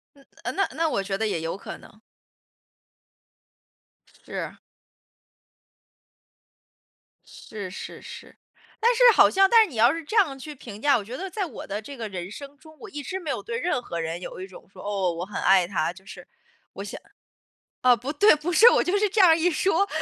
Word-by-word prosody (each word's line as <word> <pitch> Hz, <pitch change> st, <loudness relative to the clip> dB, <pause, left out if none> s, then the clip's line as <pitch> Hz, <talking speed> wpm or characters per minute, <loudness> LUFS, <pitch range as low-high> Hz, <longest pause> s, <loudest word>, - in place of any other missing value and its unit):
嗯， 275 Hz, -1 st, -22 dB, 0.2 s
呃， -, -, -2 dB
那 390 Hz, -, +1 dB
那 325 Hz, 0 st, 0 dB
我 200 Hz, -, -1 dB
觉 195 Hz, 0 st, -3 dB
得 220 Hz, +2 st, -1 dB
也 185 Hz, -6 st, -2 dB
有 165 Hz, +2 st, -4 dB
可 200 Hz, -, -9 dB
能。 215 Hz, -, -18 dB, 2.3 s
是。 -, -, -5 dB, 2.7 s
是， 205 Hz, -4 st, -9 dB
是， 185 Hz, -, -9 dB
是， -, -, -11 dB, 0.4 s
但 465 Hz, +2 st, +4 dB
是 475 Hz, -, -4 dB
好 -, -, +6 dB
像 390 Hz, 0 st, +4 dB
但 460 Hz, +2 st, +7 dB
是 405 Hz, -, -8 dB
你 255 Hz, -, -10 dB
要 235 Hz, +4 st, +5 dB
是 330 Hz, +1 st, -5 dB
这 425 Hz, -, -5 dB
样 315 Hz, -11 st, +3 dB
去 300 Hz, +3 st, -9 dB
评 220 Hz, -6 st, -11 dB
价， 290 Hz, -1 st, +4 dB
我 210 Hz, -, -6 dB
觉 235 Hz, +5 st, -7 dB
得 385 Hz, +4 st, -6 dB
在 390 Hz, 0 st, -3 dB
我 290 Hz, -, -9 dB
的 205 Hz, +2 st, -4 dB
这 275 Hz, +6 st, -10 dB
个 225 Hz, -3 st, -5 dB
人 185 Hz, -2 st, -6 dB
生 280 Hz, +6 st, -10 dB
中， 315 Hz, 0 st, -17 dB
我 420 Hz, -, -10 dB
一 295 Hz, -5 st, -6 dB
直 375 Hz, +6 st, -4 dB
没 320 Hz, -5 st, -5 dB
有 265 Hz, -, -3 dB
对 465 Hz, +1 st, -4 dB
任 360 Hz, -, -1 dB
何 170 Hz, -8 st, -5 dB
人 165 Hz, +1 st, -4 dB
有 185 Hz, -, -8 dB
一 185 Hz, -, -6 dB
种 190 Hz, -, -15 dB
说， -, -, -12 dB
哦， 195 Hz, -3 st, -1 dB
我 170 Hz, +1 st, -5 dB
很 205 Hz, -, -5 dB
爱 190 Hz, -2 st, +4 dB
他， 175 Hz, -2 st, -1 dB
就 190 Hz, +2 st, -17 dB
是 195 Hz, -, -12 dB, 0.5 s
我 -, -, -7 dB
想 -, -, -8 dB, 0.8 s
哦， 250 Hz, -1 st, +6 dB
不 250 Hz, +5 st, -5 dB
对， 410 Hz, +8 st, +6 dB
不 300 Hz, +4 st, -4 dB
是， 455 Hz, +7 st, +8 dB
我 -, -, +3 dB
就 370 Hz, +3 st, 0 dB
是 415 Hz, 0 st, +1 dB
这 420 Hz, -, -1 dB
样 370 Hz, -3 st, +7 dB
儿 320 Hz, -, +5 dB
一 340 Hz, +2 st, +2 dB
说。 380 Hz, +4 st, +1 dB
275 Hz, 225 characters per minute, -25 LUFS, -, 2.7 s, 是